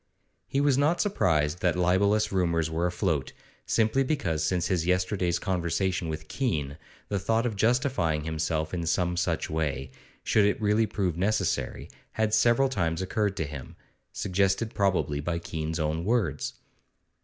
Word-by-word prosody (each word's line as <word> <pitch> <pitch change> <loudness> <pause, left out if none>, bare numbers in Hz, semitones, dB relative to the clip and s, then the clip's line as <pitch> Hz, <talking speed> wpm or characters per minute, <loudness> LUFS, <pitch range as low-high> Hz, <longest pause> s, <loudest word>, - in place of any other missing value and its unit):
He 135 - 0
was 140 -2 +3
not 155 +5 +2
surprised 80 - +1
that 90 -2 +1
libellous 100 +4 +2
rumours 85 -4 +1
were 85 +2 0
afloat, 90 -6 -1 0.3
simply 115 +5 +2
because 110 - -1
since 90 -2 0
his 90 -3 0
yesterday's 90 -1 +1
conversation 90 0 -1
with 80 0 -5
Keene 75 - -2 0.3
the 100 - 0
thought 115 +5 +1
of 115 -3 -1
justifying 110 - +1
himself 80 0 -2
in 85 -2 -2
some 90 +1 +1
such 85 -1 -1
way 70 -4 -2 0.3
should 105 -2 +3
it 105 - +1
really 110 +1 +2
prove 90 -6 -1
necessary 100 +5 -1 0.3
had 110 -1 0
several 120 +4 +4
times 85 -8 -1
occurred 100 0 -1
to 80 - -1
him, 70 -3 -8 0.4
suggested 100 +4 0
probably 95 -7 +1
by 85 +3 -2
Keene's 80 0 -4
own 80 +1 -1
words. 100 - 0
90 Hz, 150 wpm, -27 LUFS, 80-105 Hz, 0.4 s, several